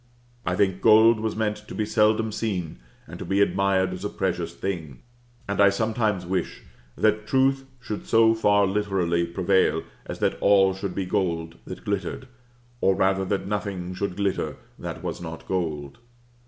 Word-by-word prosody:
I 90 - +1
think 95 -1 +1
gold 110 +1 +6
was 110 0 -2
meant 105 -1 -1
to 105 0 -11
be 110 - -1
seldom 110 +1 +2
seen 95 -7 -3 0.3
and - - -10
to - - -5
be 95 +1 0
admired 95 -2 +2
as 90 +1 -7
a 105 - -2
precious 90 -4 -2
thing; 80 -9 -5 0.4
and 100 0 0
I 100 - +7
sometimes 110 -2 0
wish 95 +1 -3 0.3
that 110 0 +1
truth 135 +2 +2
should 110 -4 -6
so 115 0 +5
far 105 -2 +3
literally 95 -4 0
prevail 95 +2 +2 0.2
as - - -5
that - - -1
all 95 -1 +5
should 95 -1 -5
be 95 - -1
gold 85 -4 -2
that - - -9
glittered, 100 +5 -3 0.5
or 95 - +3
rather 95 0 +2
that 95 0 -1
nothing 100 -3 -3
should 95 0 -3
glitter 100 -1 -1 0.2
that - - -6
was - - -4
not 80 -1 -8
gold. 80 - -3
100 Hz, 165 wpm, -25 LUFS, 90-105 Hz, 0.5 s, I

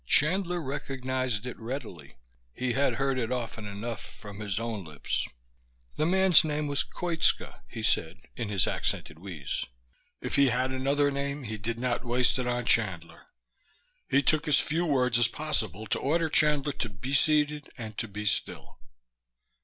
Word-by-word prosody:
Chandler 175 +3 +4
recognized 130 -4 -2
it 125 - -6
readily. 110 - -6 0.4
He 125 -1 -1
had 140 +2 +2
heard 135 -1 +1
it 115 0 -2
often 115 -4 -3
enough, 105 +3 -4
from 105 -1 -10
his 105 -1 -2
own 115 -4 -3
lips. 75 -4 -2 0.7
The 155 - +1
man's 190 -1 +6
name 150 -1 -1
was 140 -2 +1
Koitska, 170 -2 0
he - - -6
said - - +2 0.2
in 110 - -3
his 100 -4 +3
accented 75 - -2
wheeze. 85 -8 -4 0.6
If - - -2
he 140 -1 +6
had 130 +2 +1
another 140 +2 +2
name 140 +1 -2
he 110 -2 -5
did 115 +3 -2
not 125 0 -1
waste 125 +1 +2
it 125 - -1
on 120 0 -1
Chandler. 85 -8 0 0.8
He 140 +1 +4
took 155 +3 +2
as 150 - +5
few 170 +3 0
words 125 -5 +3
as 120 - +5
possible 110 -10 -2
to - - 0
order 160 +3 +1
Chandler 150 -2 +3
to 120 - -3
be 115 +8 -5
seated 150 0 +2
and 110 -3 -6
to 115 - -2
be 105 +1 -6
still. 105 - -2
125 Hz, 165 wpm, -29 LUFS, 110-145 Hz, 0.8 s, man's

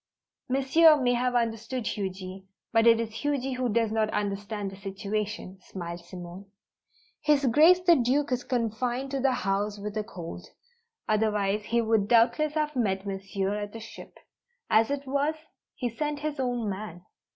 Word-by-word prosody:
"Monsieur 290 +4 +5
may 245 -2 +2
have 245 +1 0
understood 230 +1 -1
Huji. 190 -1 -4 0.3
But 225 0 +5
it 230 -1 +6
is 230 -1 -2
Huji 275 -2 -1
who 250 -1 0
does 225 0 +1
not 220 -1 +1
understand 205 0 -3
the - - -9
situation," 200 0 -4
smiled 170 -2 -7
Simone. 180 +2 -9 0.7
"His 295 -2 +3
Grace 320 +9 +6
the 350 -2 +6
Duke 265 +2 +1
is 250 -1 0
confined 245 +2 -2
to 275 - -1
the 265 0 +3
house 200 +2 0
with 205 +1 -6
a 215 - -1
cold. 175 -6 -8 0.6
Otherwise 210 -1 +1
he 235 +1 +1
would 220 -2 +2
doubtless 240 +7 +3
have 300 -1 -1
met 195 -5 0
Monsieur 195 0 -2
at 205 0 -4
the 225 - -7
ship. 225 - -11 0.5
As 220 +1 +5
it 285 0 -2
was, 285 +3 0 0.4
he 250 - -2
sent 295 +5 -3
his 300 -1 -3
own 245 -3 -1
man. 190 -3 -5
225 Hz, 160 wpm, -28 LUFS, 200-260 Hz, 0.7 s, it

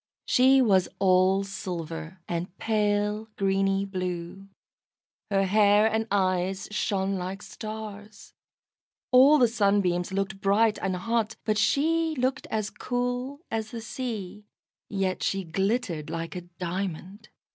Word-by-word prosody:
She 260 +1 +5
was 190 -5 +3
all 190 0 +4
silver, 170 -3 -6
and 175 +2 -4
pale 210 0 0
greeny 195 0 +1
blue. 185 0 -5 0.8
Her 195 -1 +2
hair 205 +1 +4
and 220 0 +1
eyes 190 -1 0
shone 195 -2 0
like 185 +3 -5
stars. 215 -1 -8 0.8
All 265 +4 +7
the 250 -4 +5
Sunbeams 200 -5 +1
looked 195 0 -2
bright, 210 +2 +3
and 190 -1 -1
hot, 225 +3 -1
but 215 -1 +1
she 325 +2 +2
looked 255 +1 -1
as 215 -1 -2
cool 245 +3 -3
as 220 -1 -2
the 230 - -6
sea; 215 -4 -6 0.4
yet 190 -2 -1
she 195 0 0
glittered 185 -2 -1
like 165 +1 -4
a 180 - -4 0.2
diamond. 185 +3 -5
200 Hz, 125 wpm, -27 LUFS, 185-220 Hz, 0.8 s, All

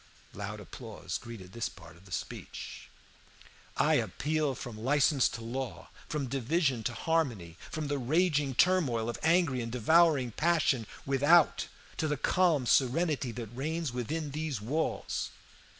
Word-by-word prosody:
Loud - - -5
applause - - -6
greeted 110 -6 -10
this 115 - -2
part - - -14
of 85 +3 -19
the 95 - -16
speech. 85 - -6 0.9
"I - - +4
appeal 150 +1 -1
from 120 -3 -7
license 140 0 +4
to 115 - -7
law, 125 +2 -5 0.2
from 150 -3 -1
division 135 +1 0
to 120 - 0
harmony, 120 - -1
from 155 -2 -3
the 145 -1 -1
raging 145 0 +2
turmoil 130 -11 +3
of 120 - -4
angry 160 -6 +3
and 115 0 -4
devouring 140 +1 +4
passion 155 -5 +2 0.2
without 145 +5 +4 0.3
to 155 - 0
the 150 -1 0
calm 165 -3 +2
serenity 135 +1 +2
that 120 -1 -7
reigns 155 +1 -2
within 145 +5 -3
these 150 -4 -3
walls. 140 +10 -2
135 Hz, 140 wpm, -31 LUFS, 120-160 Hz, 0.9 s, I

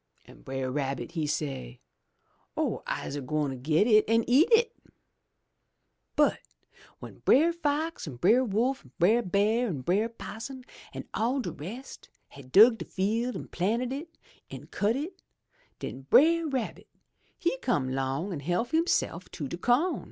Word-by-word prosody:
An' - - -16
Brer 130 - -4
Rabbit 135 -2 -3
he 160 -3 -2
say, 135 - -4 0.8
*0h, - - -1
I'se 140 - -3
gwine 135 -1 -2
get 155 +8 +3
it 215 -2 +4
an' 230 0 +4
eat 280 - +5
it!' 465 +1 +4 1.4
'*But - - +3 0.6
w'en - - -11
Brer 325 +5 +4
Fox 315 - -2
an' 140 - -6
Brer 215 - +4
Wolf 245 +4 0
an' 130 - -20
Brer 215 +8 +4
Bear 210 +5 +1
an' 155 - -3
Brer 200 - +1
'Possum 235 +3 -8 0.3
an' - - -8
all 245 +5 0
de 250 - -3
rest, 225 - -9 0.2
had 135 -2 -14
dug 225 - +7
de 170 - -5
field, 225 +5 -1
an' - - -7
planted 230 +8 -1
it, 320 +4 -8 0.3
an' - - -9
cut 210 +3 +1
it, 330 +7 -5 0.6
den 135 +1 -7
Brer 330 +3 +5
Rabbit 260 -6 -4 0.5
he 345 -7 -1
come 140 - 0
'long 135 +8 -2
an' 155 - -4
help 175 - -1
hisself 320 - 0
to 150 -5 -5
de 170 - -5
co'n. 265 - +2
215 Hz, 155 wpm, -28 LUFS, -, 1.4 s, dug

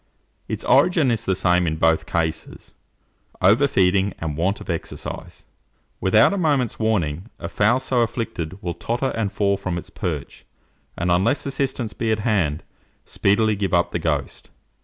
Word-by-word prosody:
Its - - -4
origin 160 -8 +4
is 115 -1 -2
the 95 - +1
same 90 -1 +2
in 80 - 0
both 80 0 +2
cases, 80 -1 -3 0.7
over 105 +10 +4
feeing 95 -3 +2
and 80 -3 -4
want 95 +6 0
of - - -11
exercise. 85 -2 -6 0.5
Without 110 - +4
a 200 - -1
moment's 145 - +1
warning, 95 -4 -1
a - - -6
fowl 110 +4 +2
so 130 -2 0
afflicted 100 -7 -3
will 85 -1 -2
totter 120 +10 -2
and 110 -3 -2
fall 100 -1 +1
from 95 -3 -3
its 85 - -8
perch, 75 -6 -5 0.5
and 90 - 0
unless 95 +10 +2
assistance 135 -5 -2
be 115 0 -1
at 110 - +2
hand, 95 -10 0 0.4
speedily 105 +2 +2
give 100 -2 0
up 85 - +2
the - - -2
ghost. - - -3
100 Hz, 160 wpm, -22 LUFS, 85-115 Hz, 0.7 s, origin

